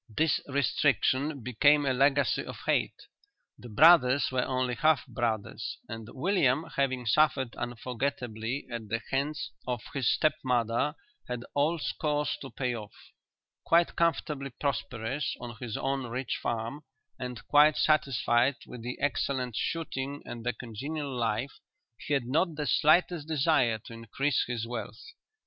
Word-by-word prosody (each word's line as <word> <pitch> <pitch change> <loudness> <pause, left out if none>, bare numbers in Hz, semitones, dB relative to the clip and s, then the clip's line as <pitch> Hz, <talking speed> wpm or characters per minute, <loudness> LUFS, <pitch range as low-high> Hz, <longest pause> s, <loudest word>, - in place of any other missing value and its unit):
This 160 -2 +2
restriction 140 0 +1
became 145 +5 +4
a 135 - +2
legacy 140 +2 +2
of - - -8
hate. - - 0 0.5
The 120 - -10
brothers 140 +1 +6
were 130 -1 +1
only 130 -1 -1
half 155 -1 +3
brothers 110 -4 -3
and 115 -1 -7
William 150 -2 +2
having 130 -3 0
suffered 130 0 +2
unforgettably 120 0 -3
at 115 -2 -5
the 115 +1 0
hands 140 +3 -1 0.2
of 125 -3 -2
his 135 -4 +2
step 155 - +3
mother 125 +3 +1 0.3
had 125 -1 -4
old 150 +3 +1
scores 150 -5 -1
to 135 - -7
pay 125 0 -2
off. 105 -2 -8 0.7
Quite 170 +1 +3
comfortably 150 -4 0
prosperous 130 -1 -2
on 120 -1 -8
his 115 -3 -4
own 135 -1 -2
rich 125 +1 -3
farm, 115 +5 -3 0.4
and 125 -3 -6
quite 150 +1 +6
satisfied 135 -3 +2
with 125 - -9
the 125 +2 -5
excellent 130 -4 -1
shooting 145 -3 -3
and 120 -1 -7
the 125 +1 0
congenial 135 +5 -5
life, 120 +2 -2 0.4
he 145 - -1
had 135 -4 0
not 160 +6 +1
the 150 -1 -3
slightest 155 +5 +3
desire 140 -7 +2
to 115 - -9
increase 115 +5 -1
his 120 -2 -3
wealth. 115 -2 -6
130 Hz, 140 wpm, -29 LUFS, 120-145 Hz, 0.7 s, brothers